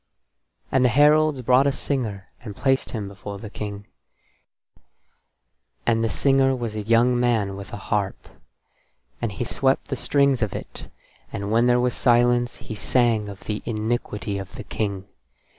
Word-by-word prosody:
And 130 -1 +3
the 125 - +5
heralds 150 +1 +4
brought 130 +3 +4
a - - +3
singer, 115 -9 -3
and 105 -5 -8
placed 135 +3 +1
him 105 -4 -4
before 100 +1 -8
the 105 +1 -9
King; 100 -2 -6 2.0
and 115 -1 +2
the 115 - +1
singer 135 +2 +3
was 115 -4 -4
a 105 - -2
young 115 +3 +3
man 110 -5 +1
with 100 0 -9
a - - -5
harp. 100 -1 -2 0.9
And 115 - -1
he 100 - -3
swept 135 +3 0
the 135 - -1
strings 140 -1 +2
of 110 -3 0
it, - - -8 0.4
and 100 +1 -4
when 115 +2 +4
there 125 0 +4
was 125 0 +1
silence 120 0 +3
he - - -8
sang 110 -1 +1
of 100 -1 -10
the 105 -1 -4
iniquity 110 -2 -2
of 95 -2 -9
the - - -7
King. 100 -3 -3
115 Hz, 160 wpm, -23 LUFS, 105-125 Hz, 2.0 s, the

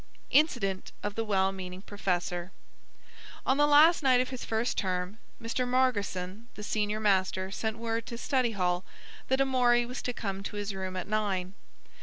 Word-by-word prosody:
INCIDENT 240 - +2
OF 205 - -2
THE 225 - -1
WELL 195 -3 +2
MEANING 185 0 -7
PROFESSOR 180 -3 -2 0.9
On 265 - +3
the 295 0 +5
last 305 +4 +7
night 260 -3 +5
of 255 - 0
his 255 -2 -6
first 225 +2 -1
term, 185 +2 -2 0.2
Mr. 230 +2 -2
Margotson, 220 -5 0
the 210 - -8
senior 210 0 -1
master, 190 -2 +1
sent 220 +2 -2
word 230 0 -2
to 235 - -5
study 255 -2 +1
hall 180 -2 0 0.4
that 265 +1 +2
Amory 250 -3 +3
was 250 +2 -5
to 250 - -2
come 195 -5 -4
to 200 - -6
his 205 -1 -3
room 190 -1 -4
at 185 - -3
nine. 200 -3 -1
210 Hz, 170 wpm, -29 LUFS, 190-245 Hz, 0.9 s, last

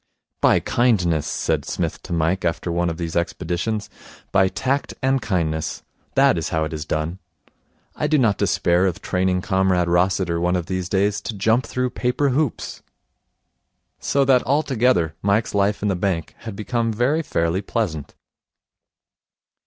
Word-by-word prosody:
'By - - +5
kindness,' 90 -11 +1
said - - -1
Psmith - - -3
to - - -11
Mike, 85 +3 0
after 85 0 -1
one 85 0 0
of 80 - -4
these 85 -2 -4
expeditions. 90 +5 -2 0.4
'By 95 -1 +4
tact 130 +9 -2
and 135 0 +2
kindness. 80 -6 -2 0.3
That - - +4
is - - -3
how 80 -1 0
it 80 - -4
is 75 -1 -4
done. 80 +4 -2 0.8
I 150 - -1
do 155 0 +3
not 115 -7 +2
despair 90 +2 +2
of 90 - -2
training 90 0 0
Comrade 95 -3 +2
Rossiter 85 -1 +1
one 90 +1 +1
of 90 -2 -1
these 95 0 -3
days 100 +1 +1
to 110 - -5
jump 115 +5 +2
through 125 -1 -1
paper 125 +3 0
hoops.' 140 0 -2 1.2
So 140 -1 +1
that, 130 -2 +5
altogether, 125 - +1
Mike's 105 +3 +1
life 100 0 +1
in - - +2
the 100 - +1
bank 90 -3 -2
had 110 -3 -7
become 115 +2 -1
very 125 +9 +1
fairly 85 - 0
pleasant. 95 - -3
95 Hz, 155 wpm, -22 LUFS, 85-115 Hz, 1.2 s, By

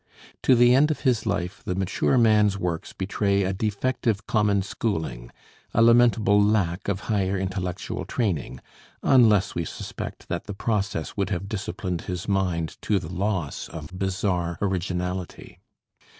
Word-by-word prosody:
To 130 - +5
the 120 +1 +6
end 145 +4 +5
of 155 - -2
his 125 -5 +1
life, 100 -1 -2
the 90 - -2
mature 95 +7 +1
man's 105 -4 +4
works 85 -4 -3
betray 100 +1 0
a 95 +1 -1
defective 110 +2 -1
common 105 -3 +2
schooling, 80 - -3 0.5
a 115 - +5
lamentable 115 -3 +5
lack 100 -3 +1
of 100 -1 -1
higher 100 -3 0
intellectual 95 -1 -3
training 80 - -2 0.4
unless 110 -7 +5
we 85 - -2
suspect - - -7
that - - -3
the 100 - -6
process 100 -7 -2
would 100 -2 -1
have 100 -1 -3
disciplined 95 -4 -4
his 90 -1 -5
mind, 90 -5 -1
to 105 - +1
the 90 -1 -5
loss 95 -6 -2
of 80 +2 -8
bizarre 90 -3 -1
originality. 90 -2 -3
100 Hz, 145 wpm, -25 LUFS, 90-105 Hz, 0.5 s, the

